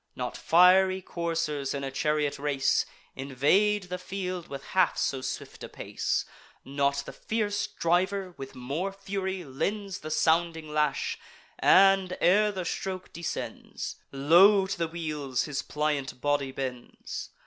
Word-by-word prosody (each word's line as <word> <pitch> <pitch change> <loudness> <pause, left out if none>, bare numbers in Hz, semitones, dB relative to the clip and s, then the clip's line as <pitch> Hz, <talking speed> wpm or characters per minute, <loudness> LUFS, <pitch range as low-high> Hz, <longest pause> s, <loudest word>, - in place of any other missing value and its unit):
Not 125 -1 -4
fiery 185 +2 +5
coursers, 165 -6 -2
in 140 - -4
a 135 - -3
chariot 150 +1 0
race, 140 -2 +1 0.3
Invade 150 +11 +2
the 180 0 -5
field 185 -2 -4
with 135 -1 -7
half 185 - +2
so 135 - 0
swift - - -6
a - - -7
pace; - - -2 0.4
Not 140 +1 0
the - - -8
fierce 210 -2 -1
driver 185 +2 0
with 135 0 -9
more 140 +10 -3
fury 195 -1 -4
lends 195 +8 -3
The 155 - -7
sounding 160 -1 +1
lash, 150 -2 0 0.4
and, 195 -1 +5
ere 210 +4 +4
the 185 -3 -4
stroke 185 +1 -4
descends, 170 0 -5
Low 175 +9 +6
to 195 +1 -3
the 170 -4 -1
wheels 150 -6 -2
his 145 -2 -3
pliant 150 -3 -2
body 145 -1 0
bends. 130 -2 -6
165 Hz, 135 wpm, -28 LUFS, 140-190 Hz, 0.4 s, Low